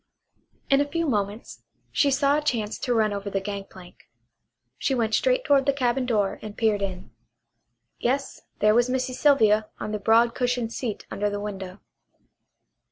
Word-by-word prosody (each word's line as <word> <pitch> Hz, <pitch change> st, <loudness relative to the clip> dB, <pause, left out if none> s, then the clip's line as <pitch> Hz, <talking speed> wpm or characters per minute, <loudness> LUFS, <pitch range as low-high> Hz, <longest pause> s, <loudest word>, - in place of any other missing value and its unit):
In 275 Hz, +1 st, +5 dB
a 285 Hz, -, 0 dB
few 335 Hz, +2 st, -1 dB
moments 205 Hz, -2 st, -3 dB, 0.3 s
she 285 Hz, -, +3 dB
saw 275 Hz, +1 st, +2 dB
a 300 Hz, -, +1 dB
chance 225 Hz, -8 st, -2 dB
to 245 Hz, -, -1 dB
run 215 Hz, -2 st, +2 dB
over 200 Hz, 0 st, -4 dB
the 195 Hz, -, -1 dB
gangplank. 195 Hz, -2 st, -9 dB, 0.7 s
She 270 Hz, -, 0 dB
went 225 Hz, -3 st, 0 dB
straight -, -, +2 dB
toward 280 Hz, -2 st, +3 dB
the 280 Hz, -, +4 dB
cabin 255 Hz, -1 st, 0 dB
door 210 Hz, -5 st, 0 dB
and 210 Hz, -1 st, -8 dB
peered 215 Hz, -3 st, +1 dB
in. 185 Hz, -2 st, -5 dB, 0.9 s
Yes, 270 Hz, +3 st, -1 dB, 0.2 s
there 210 Hz, +1 st, +5 dB
was 240 Hz, +2 st, +3 dB
Missy 255 Hz, 0 st, -1 dB
Sylvia 220 Hz, -7 st, +3 dB
on 215 Hz, -, -4 dB
the 210 Hz, -, -2 dB
broad 230 Hz, +3 st, +4 dB
cushioned 245 Hz, -2 st, -1 dB
seat 230 Hz, -5 st, -4 dB
under 205 Hz, +1 st, -1 dB
the 205 Hz, 0 st, -4 dB
window. 195 Hz, -2 st, -7 dB
225 Hz, 165 wpm, -25 LUFS, 205-265 Hz, 0.9 s, In